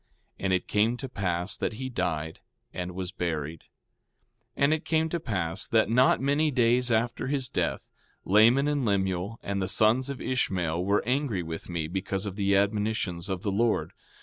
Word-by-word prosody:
And 95 - -1
it 95 -1 0
came 110 +4 +2
to 135 - -6
pass 90 -5 -2
that - - -2
he 130 +4 -5
died, 80 -10 -3 0.3
and 90 0 -5
was 95 -1 -4
buried. 80 -4 -4 0.9
4:13 - - +1
And 145 +2 +5
it 155 - -2
came 160 0 +1
to 170 - -2
pass 90 - -2
that 110 -1 +2
not 125 +3 +4
many 145 +3 +2
days 125 -1 +2
after 115 +2 0
his 135 -2 0
death, - - -2 0.3
Laman 115 +8 +5
and 145 -2 0
Lemuel 100 0 -1
and 100 0 -2
the 95 - -1
sons 115 +7 +2
of 140 - -5
Ishmael 90 -9 -1
were 100 +2 +1
angry 125 -7 0
with 80 +1 -7
me 85 -3 -2
because 95 +3 -2
of 100 -2 -5
the 100 -1 +2
admonitions 100 -3 0
of 95 -1 -3
the 100 - 0
Lord. 115 +3 0
105 Hz, 180 wpm, -27 LUFS, 90-125 Hz, 0.9 s, And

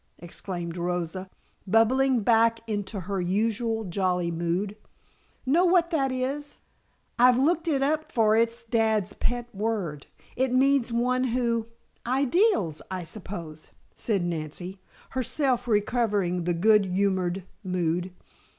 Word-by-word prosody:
exclaimed 175 0 -6
Rosa, 180 +1 -3 0.4
bubbling 245 +4 +3
back 230 +1 +3
into 205 -2 -3
her 190 +1 -3
usual 220 +4 0
jolly 180 -2 0
mood. 175 +5 -2 0.7
"Know 310 +7 +3
what 350 -1 +3
that 275 -5 +1
is? 275 +3 -3 0.6
I've 250 0 +6
looked 325 +5 +2
it 275 -4 +1
up 310 +2 0
for 220 -2 +3
it's 230 +1 +1
dad's 220 -3 +1
pet 240 +1 -3
word. 195 -9 -3 0.3
It 260 0 +1
means 260 -1 +3
one 250 +2 +1
who 235 -2 0 0.2
" - - -40
"Ideals 280 - +2
I 185 -1 -4
suppose," 170 -4 -8 0.3
said 200 -6 -1
Nancy, 175 +3 -5 0.3
herself 260 -1 0
recovering 205 -5 +1
the 175 -1 +1
good 210 +3 +4
humored 185 -1 0 0.2
mood. 180 -1 -1
220 Hz, 125 wpm, -26 LUFS, 180-250 Hz, 0.7 s, I've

